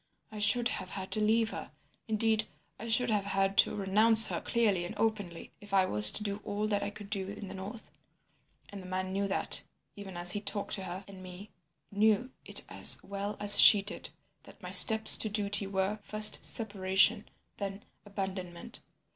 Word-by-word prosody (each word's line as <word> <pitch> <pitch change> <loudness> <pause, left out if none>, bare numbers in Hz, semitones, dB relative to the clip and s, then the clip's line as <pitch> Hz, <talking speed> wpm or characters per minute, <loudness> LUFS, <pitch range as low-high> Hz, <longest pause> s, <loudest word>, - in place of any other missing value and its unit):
I 215 - -11
should 220 +4 -1
have 185 - -7
had 190 -1 -10
to 215 - -4
leave 220 +1 -2
her; - - -11 0.4
indeed, 220 0 -2 0.3
I 230 - -10
should 235 +1 -2
have 205 -2 -3
had 195 0 -4
to - - +1
renounce 215 +3 +4
her - - -6
clearly 210 -7 -3
and 175 - -10
openly, 205 -7 -6
if 205 -1 -8
I 190 -1 +1
was 105 - +6
to 210 - -4
do 200 0 -7
all 205 +1 -6
that 205 -1 -3
I - - -6
could 205 0 -15
do 195 -3 -5
in 205 0 -11
the - - -11
north. 195 +4 -12 0.8
And 200 -1 -12
the 185 - -14
man 185 0 -7
knew 200 +1 -4
that, 195 - -4 0.3
even 195 -3 -12
as 175 0 +1
he 205 - -3
talked 205 -1 -5
to 195 -2 -7
her 185 +2 -10
and 195 -1 -15
me, 185 +3 -14 0.4
knew 220 +4 -2
it - - -5
as - - +6
well 200 +1 -8
as 205 0 +7
she 205 -2 +6
did, 205 - -9 0.3
that - - -20
my - - -10
steps 220 -1 +9
to 215 - -4
duty 205 -1 -4
were—first, 210 +2 +2
separation, 205 0 -2 0.3
then 200 0 -9 0.2
abandonment. 190 +1 -10
205 Hz, 190 wpm, -27 LUFS, 190-215 Hz, 0.8 s, steps